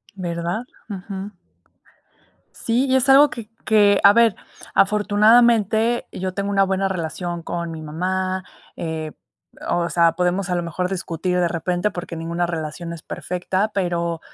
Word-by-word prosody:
¿Verdad? 175 +4 -3 0.3
Ujú. 195 +1 -6 1.2
Sí, 240 +4 0
y 260 - +3
es 265 +1 +2
algo 285 +2 +7
que 230 -3 -8 0.2
que, 205 -2 +4
a 200 - +9
ver, 230 -1 +4 0.4
afortunadamente 220 +2 +4
yo 185 0 -4
tengo 200 +1 -2
una 195 -1 +3
buena 190 0 0
relación 170 -1 -4
con 170 -1 -4
mi 160 -1 -7
mamá, 185 +4 -2 0.3
eh, 160 -2 -4 0.6
o 170 0 0
sea, 170 -1 +4
podemos 180 +1 0
a 180 - +1
lo 175 - -1
mejor 180 +2 -3
discutir 180 -1 -2
de 175 - +2
repente, 175 +4 -1
porque 175 -3 -7
ninguna 170 +2 -2
relación 165 0 -5
es 170 -2 -8
perfecta, 185 +4 -2
pero, 170 -3 -1
185 Hz, 145 wpm, -21 LUFS, 170-205 Hz, 1.2 s, a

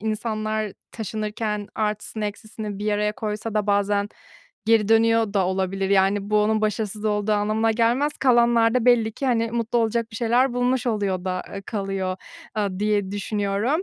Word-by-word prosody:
İnsanlar 215 -1 -2 0.2
taşınırken 215 -1 -3
artısını 210 0 -2
eksisini 210 0 -6
bir 210 +1 -1
araya 210 0 +1
koysa 215 -1 -4
da 210 -1 0
bazen 200 0 +1 0.6
geri 220 -2 +4
dönüyor 225 -1 +3
da 195 -2 +2
olabilir. 190 +1 -1
Yani, 200 +1 +2
bu 210 0 +4
onun 215 +1 +1
başarısız 215 0 -2
olduğu 210 0 +1
anlamına 215 +2 +1
gelmez. 240 +6 +2
Kalanlar 235 -2 +4
da 250 - +2
belli 230 -3 +4
ki, 275 - -4
hani, 230 -3 +1
mutlu 235 0 0
olacak 230 0 0
bir 220 - -8
şeyler 240 +3 +2
bulmuş 245 0 0
oluyor 200 -5 -1
da, 185 -1 -2
eee, 195 - -6
kalıyor, 195 -3 -3 0.4
aaa, 200 -4 -1
diye 205 -2 +1
düşünüyorum. 205 - -1
215 Hz, 160 wpm, -23 LUFS, 205-230 Hz, 0.6 s, geri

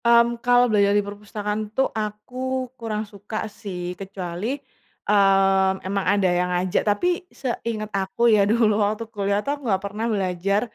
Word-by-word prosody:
Mmm, 235 0 +4
kalau 245 0 +5
belajar 205 -3 +3
di 205 - +1
perpustakaan 210 +1 -4 0.2
tuh 265 - +4
aku 250 +5 -3
kurang 220 -3 -4
suka 205 +1 -8
sih, 190 -4 -6
kecuali, 195 +5 -4 0.5
mmm, 195 -1 +3
emang 195 0 -1
ada 200 -1 +2
yang 180 0 +1
ngajak. 180 0 +1
Tapi 205 +12 +1 0.2
seinget 230 -4 -4
aku 195 +3 -3
ya 210 - +5
dulu 220 -2 +3
waktu 215 +2 0
kuliah 200 0 0
tuh, 280 - 0
aku 290 -1 -8
nggak 190 -1 +1
pernah 210 +3 -3
belajar 195 -1 0
205 Hz, 155 wpm, -23 LUFS, 195-225 Hz, 0.5 s, kalau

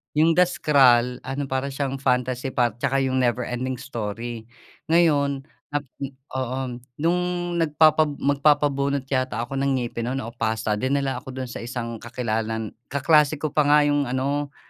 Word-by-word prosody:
Yung 160 +2 +5
The 180 +2 +4
Scroll, 125 -7 +4
ano 135 +2 -2
para 135 0 -2
siyang 135 -1 -3
fantasy 125 -1 0
par 120 -3 0
tsaka 135 +1 +1
yung 130 0 0
Never 125 -1 +1
Ending 125 +2 -3
Story. 115 -2 -5 0.4
Ngayon 145 -5 +3 0.2
nap 145 0 -2 0.2
mm, 140 -1 -4 0.3
oo. 130 +1 -2 0.4
Nung 175 +2 +3 0.4
nagpapa 155 0 +4
magpabunot 140 -1 +1
yata 130 -3 0
ako 135 +3 -4
ng 135 0 +1
ngipin 120 -2 -3
no'n 130 +1 -2
o 115 - -6
pasta 110 -2 -1
dinala 135 +1 0
ako 130 - -10
do'n 130 -2 -5
sa - - -6
isang 115 -1 -5
kakilala 115 -2 -2
n 110 -1 -4 0.2
kaklase 150 +2 +3
ko 150 0 -3
pa 150 -1 +2
nga 150 0 +6
yung 145 -1 +1
ano 140 +3 -2
135 Hz, 165 wpm, -24 LUFS, 120-145 Hz, 0.4 s, nga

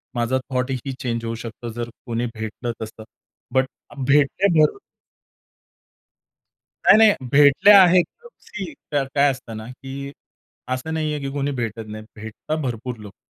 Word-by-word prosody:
माझा 120 +2 +1
थॉट 130 0 -1
ही 135 - -4
चेंज 115 -3 -3
होऊ 115 0 -3
शकतो 115 +1 -7
जर 120 0 -4 0.2
कोणी 120 -1 -2
भेटलं 110 +2 -4
तसं, 110 0 -7 0.5
बट 130 0 +3 0.3
भेटले 140 +7 +3 0.2
तर 150 - +1 2.1
नाही-नाही. 215 -1 +7 0.2
भेटल्या 150 +8 +7
आहेत. 180 0 +5 0.4
सी 190 -8 -7 0.2
काय 145 -2 +1
काय 140 0 +5
असतं 125 -4 -8
ना, 110 +1 -8
की 135 +2 -8 0.6
असं 130 +5 -3
नाहीये 155 -2 -1
की 140 -1 -4
कोणी 140 0 -1
भेटत 115 -3 -4
नाही. 110 0 -8
भेटतात 110 +8 -5
भरपूर 125 -2 -4
लोकं. 105 -2 -12
130 Hz, 140 wpm, -22 LUFS, 115-145 Hz, 2.1 s, नाही-नाही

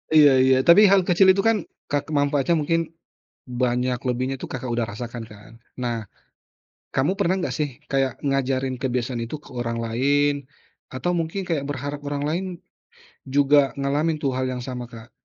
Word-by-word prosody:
Iya 145 -2 +8
iya. 130 0 +5
Tapi 170 +5 +8
hal 195 -1 +5
kecil 190 +2 +5
itu 195 - +1
kan 225 -1 +4 0.3
ka 145 - +1
ke - - -17
manfaatnya 145 +3 +2
mungkin 165 +2 +1 0.6
banyak 125 0 -1
lebihnya 130 +2 -1
itu - - -5
Kakak 130 -1 -5
udah 120 -1 0
rasakan 120 +1 -6
kan. 105 +2 -14 0.3
Nah 115 -3 -2 0.9
kamu 140 +7 +2
pernah 190 -1 +2
nggak - - -2
sih 150 -1 0 0.2
kayak 135 -2 0
ngajarin 135 -1 0
kebiasaan 125 -1 -1
itu 120 +7 -5
ke - - -15
orang 115 -1 -2
lain 140 +5 +2 0.6
atau 130 +8 -2
mungkin 165 +4 -2
kayak 155 -5 -1
berharap 145 +1 -4
orang 145 0 -2
lain 180 +4 -1 0.9
juga 145 -1 +4
ngalamin 150 +4 0
tuh 135 - +1
hal 130 0 -1
yang 125 -1 -4
sama, 125 -1 -5
Kak? 115 0 -12
135 Hz, 170 wpm, -23 LUFS, 125-150 Hz, 0.9 s, Iya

